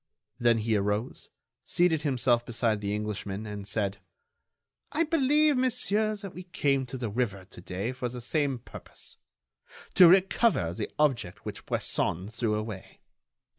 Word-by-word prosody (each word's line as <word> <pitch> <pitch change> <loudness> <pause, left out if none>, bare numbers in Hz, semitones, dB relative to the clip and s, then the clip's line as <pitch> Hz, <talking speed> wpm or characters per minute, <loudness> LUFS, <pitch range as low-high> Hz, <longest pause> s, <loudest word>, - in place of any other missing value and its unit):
Then 120 -1 +4
he 110 0 0
arose, 105 +3 -2 0.3
seated 170 -3 +2
himself 125 -4 +2
beside 115 -3 0
the 100 0 -2
Englishman, 105 -1 -4
and 105 -1 -6
said: 100 -1 -1 0.9
"I 325 - +2
believe, 300 -2 +3
monsieur, 220 -4 +1
that 200 -3 -8
we 180 +1 -9
came 140 -6 0
to 130 - -5
the 120 -4 -3
river 100 -5 -2
to 90 - -12
day 95 +6 -3
for 125 -1 -4
the 125 +1 -7
same 140 +2 0
purpose: 120 - -12 0.8
to 180 - +9
recover 190 - +3
the - - -4
object 120 -12 0
which - - -7
Bresson 90 +4 -1
threw 115 -1 -1
away. 105 -3 -6
120 Hz, 145 wpm, -28 LUFS, 105-175 Hz, 0.9 s, to